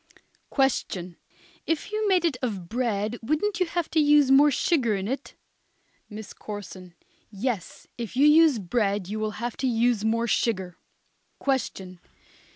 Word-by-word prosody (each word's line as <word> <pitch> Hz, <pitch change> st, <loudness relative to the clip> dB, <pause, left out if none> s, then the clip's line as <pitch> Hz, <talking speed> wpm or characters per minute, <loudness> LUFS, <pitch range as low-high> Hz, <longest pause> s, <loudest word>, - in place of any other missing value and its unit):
Question. 185 Hz, -, -1 dB, 0.5 s
If 325 Hz, +4 st, -2 dB
you 430 Hz, 0 st, -1 dB
made 370 Hz, -3 st, +3 dB
it 320 Hz, -6 st, +1 dB
of 200 Hz, -9 st, -3 dB
bread 230 Hz, 0 st, -2 dB
wouldn't 310 Hz, -, -1 dB
you 365 Hz, -, +2 dB
have 340 Hz, -1 st, -2 dB
to 320 Hz, -, +2 dB
use 295 Hz, -2 st, +5 dB
more 285 Hz, +2 st, +7 dB
sugar 260 Hz, -, +1 dB
in 195 Hz, 0 st, -3 dB
it? 265 Hz, +4 st, -5 dB, 0.7 s
MISS 215 Hz, -1 st, -9 dB
CORSON. 185 Hz, -4 st, -9 dB, 0.3 s
Yes, 210 Hz, -2 st, -4 dB
if 235 Hz, +1 st, -5 dB
you 275 Hz, +3 st, +4 dB
use 305 Hz, -2 st, +6 dB
bread 200 Hz, -1 st, -1 dB
you 215 Hz, +2 st, -4 dB
would 215 Hz, -1 st, -3 dB
have 235 Hz, +1 st, -4 dB
to 265 Hz, -, -1 dB
use 235 Hz, -2 st, +1 dB
more 230 Hz, +1 st, +1 dB
sugar. 190 Hz, -6 st, -1 dB, 0.6 s
_Question. 190 Hz, -9 st, -2 dB
235 Hz, 150 wpm, -26 LUFS, 205-290 Hz, 0.7 s, more